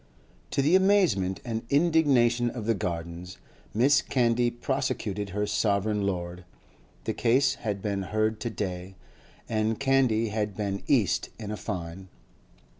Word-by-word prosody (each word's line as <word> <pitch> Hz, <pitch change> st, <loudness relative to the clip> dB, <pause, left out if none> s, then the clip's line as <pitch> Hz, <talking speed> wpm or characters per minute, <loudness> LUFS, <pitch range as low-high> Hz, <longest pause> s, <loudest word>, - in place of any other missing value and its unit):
To 140 Hz, -, 0 dB
the 155 Hz, +6 st, +4 dB
amazement 185 Hz, -, +3 dB
and 115 Hz, -2 st, -2 dB
indignation 140 Hz, -7 st, +3 dB
of 115 Hz, -3 st, -6 dB
the 115 Hz, -, +2 dB
Gardens, 85 Hz, -1 st, -5 dB, 0.4 s
Mrs. 135 Hz, +4 st, +3 dB
Candy 120 Hz, -1 st, +2 dB
prosecuted 110 Hz, -5 st, -2 dB
her 105 Hz, +2 st, -1 dB
sovereign 105 Hz, 0 st, 0 dB
lord; 90 Hz, -1 st, -4 dB, 0.6 s
the -, -, -2 dB
case 130 Hz, +3 st, +3 dB
had 105 Hz, -4 st, -3 dB
been 100 Hz, -2 st, -1 dB
heard 110 Hz, +3 st, -1 dB
to 120 Hz, -, -3 dB
day, 95 Hz, -3 st, -5 dB, 0.5 s
and 110 Hz, 0 st, 0 dB
Candy 130 Hz, -5 st, +2 dB
had 105 Hz, -2 st, -2 dB
been 100 Hz, -2 st, -2 dB
cast 105 Hz, -11 st, +1 dB
in 105 Hz, -2 st, -6 dB
a -, -, -2 dB
fine. 95 Hz, -2 st, -6 dB
110 Hz, 135 wpm, -27 LUFS, 95-120 Hz, 0.6 s, the